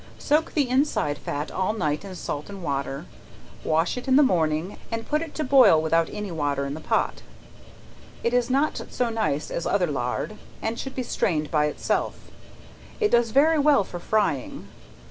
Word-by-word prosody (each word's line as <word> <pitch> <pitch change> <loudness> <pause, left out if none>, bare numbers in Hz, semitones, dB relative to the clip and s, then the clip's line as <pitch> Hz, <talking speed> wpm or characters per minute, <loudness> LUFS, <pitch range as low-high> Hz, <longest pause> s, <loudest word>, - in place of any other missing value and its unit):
Soak 305 +2 +1
the 290 -4 +2
inside 255 - +1
fat 145 +2 -4
all 190 +3 0
night 155 -7 -1
in 195 -2 -8
salt 150 -2 -5
and 195 -2 -8
water; 140 -2 -3 0.6
wash 160 +8 +1
it 250 - -6
in 260 - +4
the 295 - +7
morning, 165 - 0
and 230 0 -3
put 300 +1 +1
it 325 -2 -7
to 310 - -1
boil 260 - +6
without 160 +1 +2
any 210 -2 -5
water 145 -3 -1
in 140 - -4
the 155 - -6
pot. - - -1 1.0
It 235 - +1
is 245 0 +2
not 280 +4 +1
so 245 -2 -1
nice 155 -10 -1
as 170 - -2
other 195 -3 +2
lard, 140 +7 -3 0.2
and 225 +1 -3
should 265 0 -6
be 255 - -2
strained 155 -10 -1
by 150 -2 +3
itself. 150 - -2 0.7
It 425 -2 +2
does 235 -1 +4
very 300 +6 +4
well 285 -6 +4
for 175 -2 -8
frying. 195 -10 -1
200 Hz, 185 wpm, -25 LUFS, 155-255 Hz, 1.0 s, the